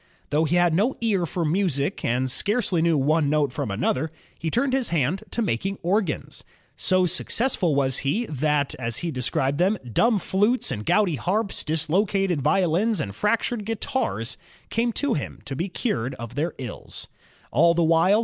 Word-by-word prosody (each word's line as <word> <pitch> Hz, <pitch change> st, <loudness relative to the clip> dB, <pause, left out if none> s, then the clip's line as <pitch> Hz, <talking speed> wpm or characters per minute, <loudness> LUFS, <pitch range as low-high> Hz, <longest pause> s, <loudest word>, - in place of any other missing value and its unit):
Though 155 Hz, +2 st, +3 dB
he 165 Hz, -, +1 dB
had 175 Hz, -2 st, +4 dB
no 215 Hz, +10 st, +2 dB
ear 200 Hz, -7 st, +1 dB
for 170 Hz, +3 st, -2 dB
music 165 Hz, -2 st, 0 dB
and 125 Hz, +2 st, 0 dB
scarcely 200 Hz, -, +1 dB
knew 165 Hz, -2 st, +3 dB
one 145 Hz, +2 st, +2 dB
note 145 Hz, -3 st, +1 dB
from -, -, -3 dB
another, 125 Hz, +9 st, 0 dB, 0.3 s
he 165 Hz, -, -2 dB
turned 255 Hz, -, +1 dB
his 265 Hz, -3 st, +1 dB
hand 165 Hz, +3 st, 0 dB
to 235 Hz, -, -1 dB
making 195 Hz, -, -1 dB
organs. 185 Hz, -2 st, -1 dB, 0.3 s
So 185 Hz, 0 st, +2 dB
successful 180 Hz, -, 0 dB
was 135 Hz, -2 st, +2 dB
he, 200 Hz, -, 0 dB
that 150 Hz, -, 0 dB
many 120 Hz, +8 st, -2 dB
dimib 150 Hz, -, +1 dB
flutes 210 Hz, -, +1 dB
and 105 Hz, -4 st, -4 dB
gouty 180 Hz, -4 st, +3 dB
harps, 200 Hz, -, -1 dB
dislocated 175 Hz, +2 st, +1 dB
violins, 180 Hz, -, +2 dB
and 100 Hz, -9 st, -3 dB
fractured 220 Hz, -, 0 dB
guitars" 200 Hz, -, -2 dB, 0.3 s
came 235 Hz, +1 st, +1 dB
to 285 Hz, 0 st, 0 dB
him 145 Hz, -, -4 dB
to 135 Hz, -, -5 dB
be 175 Hz, +8 st, -2 dB
cured 130 Hz, -, -2 dB
of 115 Hz, -1 st, -8 dB
their 150 Hz, +5 st, -2 dB
ills. 125 Hz, -5 st, -7 dB, 0.4 s
All 170 Hz, 0 st, +4 dB
the 170 Hz, -, +3 dB
while. 165 Hz, +6 st, +4 dB
170 Hz, 160 wpm, -24 LUFS, 140-205 Hz, 0.4 s, had